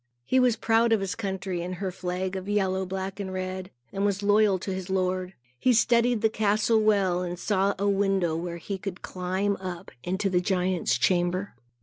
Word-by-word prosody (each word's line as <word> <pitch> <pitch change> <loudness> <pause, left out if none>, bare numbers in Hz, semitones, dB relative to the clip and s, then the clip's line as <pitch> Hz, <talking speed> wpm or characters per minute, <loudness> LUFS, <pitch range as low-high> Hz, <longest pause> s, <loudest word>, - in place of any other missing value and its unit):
He 260 - +3
was 250 -3 +4
proud 230 +1 +2
of 220 - +3
his 195 -2 -2
country 190 -4 -3
and 180 +1 -4
her 190 0 -3
flag 185 +1 -3
of 190 +1 -5
yellow, 190 -2 0
black 190 +1 -4
and 190 -2 -4
red, 185 0 -4 0.2
and 195 - -1
was 200 0 0
loyal 205 -1 +4
to 190 +1 -4
his 185 0 -5
lord. 185 -1 -1 0.2
He 255 - +4
studied 235 0 +3
the 225 - +5
castle 215 +1 +2
well 195 -4 +2
and 175 -1 -4
saw 195 +2 +1
a 200 +2 0
window, 195 -4 +2
where 170 +1 -4
he 195 +3 -5
could 185 -2 -6
climb 190 +2 -1
up 185 -1 -7
into 190 +3 -1
the 180 -2 +2
giant's 185 -1 +1
chamber. 180 +2 +1
190 Hz, 195 wpm, -27 LUFS, 185-205 Hz, 0.2 s, the